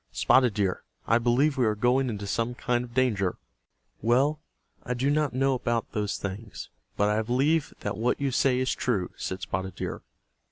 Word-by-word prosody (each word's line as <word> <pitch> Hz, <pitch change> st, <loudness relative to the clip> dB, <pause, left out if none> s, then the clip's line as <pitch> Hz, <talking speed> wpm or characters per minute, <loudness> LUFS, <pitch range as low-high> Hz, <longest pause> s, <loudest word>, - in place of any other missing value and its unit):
Spotted 125 Hz, -5 st, +3 dB
Deer, 95 Hz, -3 st, 0 dB, 0.2 s
I 115 Hz, +2 st, +3 dB
believe 130 Hz, +5 st, +2 dB
we 125 Hz, -, +4 dB
are 105 Hz, -, +1 dB
going 125 Hz, +4 st, +2 dB
into 105 Hz, -3 st, -4 dB
some 115 Hz, +4 st, -1 dB
kind 120 Hz, 0 st, 0 dB
of 120 Hz, -1 st, -11 dB
danger." 105 Hz, -8 st, +1 dB, 0.6 s
"Well, 135 Hz, +7 st, +2 dB, 0.4 s
I 125 Hz, -, -3 dB
do 135 Hz, +4 st, +1 dB
not 150 Hz, -1 st, +1 dB
know 135 Hz, +2 st, +2 dB
about 120 Hz, -2 st, -1 dB
those 105 Hz, -1 st, -2 dB
things, 100 Hz, +3 st, -6 dB, 0.3 s
but 105 Hz, -, +3 dB
I 105 Hz, +1 st, +2 dB
believe 135 Hz, +7 st, +1 dB
that 100 Hz, -1 st, -3 dB
what 120 Hz, +3 st, 0 dB
you 140 Hz, -1 st, 0 dB
say 125 Hz, +1 st, +2 dB
is 130 Hz, 0 st, +1 dB
true," 100 Hz, -8 st, -1 dB
said 95 Hz, 0 st, -5 dB
Spotted 95 Hz, +1 st, -4 dB
Deer. -, -, -4 dB
120 Hz, 185 wpm, -27 LUFS, 105-130 Hz, 0.6 s, we